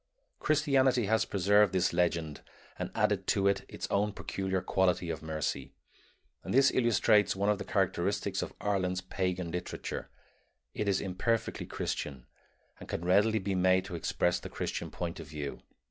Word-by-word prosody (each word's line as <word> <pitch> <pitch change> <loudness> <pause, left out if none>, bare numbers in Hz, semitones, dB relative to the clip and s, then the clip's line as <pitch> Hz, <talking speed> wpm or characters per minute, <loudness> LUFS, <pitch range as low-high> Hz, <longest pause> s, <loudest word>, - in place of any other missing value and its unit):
Christianity 135 -5 +3
has 110 +2 +2
preserved 100 0 +3
this 95 -2 +2
legend 85 -3 0 0.4
and - - -2
added - - +1
to 100 0 +2
it 95 0 +1
its - - -5
own 105 +1 +1
peculiar 95 -2 -2
quality 90 -2 +1
of 80 - -5
mercy; 80 -4 -3 0.7
and - - -3
this 135 0 +6
illustrates 110 -4 +3
one 100 +2 +1
of 105 -1 +2
the - - -3
characteristics - - 0
of - - -4
Ireland's 95 -2 0
pagan 90 -2 -2
literature 90 +1 -5 0.6
it 105 - -2
is 100 - +2
imperfectly 110 +5 -1
Christian 65 -4 -4 0.5
and - - -11
can 85 - -3
readily 105 +5 +4
be 100 -1 -2
made 95 0 +3
to 90 - -6
express 90 +1 0
the - - -8
Christian - - -4
point 85 -1 -5
of 80 - -8
view. 75 -2 -6
95 Hz, 160 wpm, -31 LUFS, 90-105 Hz, 0.7 s, this